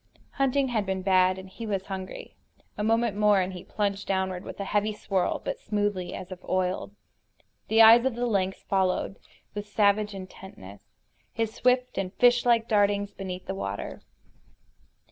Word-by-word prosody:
Hunting 275 0 +1
had 225 -4 0
been 190 -1 -2
bad, 185 -1 +3
and 190 0 -9
he 220 +4 -8
was 195 -2 -2
hungry. 190 -1 -7 0.4
A 210 - -3
moment 225 0 +1
more 210 -1 +4
and 185 0 -1
he 180 - -8
plunged 200 -1 -2
downward 190 -1 -1
with - - -9
a - - -2
heavy 210 +1 0
swirl, 195 -3 -1
but - - -3
smoothly, 205 -4 -2
as 185 0 -8
if 185 0 -9
oiled. 185 +2 -1 0.7
The 225 +1 +6
eyes 230 +2 +8
of 265 -3 0
the 245 +1 -1
lynx 195 -4 -1
followed, 190 0 0 0.3
with 205 0 -5
savage 205 0 +2
intentness, 185 - -11 0.5
his 225 -1 -2
swift 250 -3 +1
and 185 -1 -3
fishlike 240 -2 +4
dartings 205 -1 +2
beneath 185 -2 -6
the - - -3
water. 100 +1 -5
200 Hz, 165 wpm, -27 LUFS, 185-220 Hz, 0.7 s, eyes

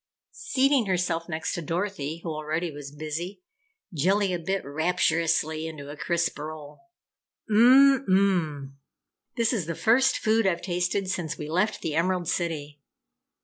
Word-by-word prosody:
Seating 275 - +1
herself 175 -2 -1
next 160 -1 -3
to 175 - -3
Dorothy 165 -2 -3
who 170 - -4
already 155 +2 -3
was 145 -1 -8
busy, 160 +6 -6 0.5
Jellia 185 +3 +1
bit 190 +2 -2
rapturously 160 0 0
into 145 -3 -8
a - - -8
crisp 170 +1 -1
roll. 150 -1 -8 0.7
"Mmm 260 +5 +6
mmm! 170 -8 +1 0.7
This 230 +1 +2
is 190 -9 -2
the 170 - -3
first 250 +8 +3
food 220 -1 +2
I've 170 -3 0
tasted 180 +2 -1
since 175 -5 -3
we 150 - -6
left 190 +6 0
the 160 - -3
Emerald 175 +2 0
City. 150 -5 -3
170 Hz, 140 wpm, -26 LUFS, 155-195 Hz, 0.7 s, Mmm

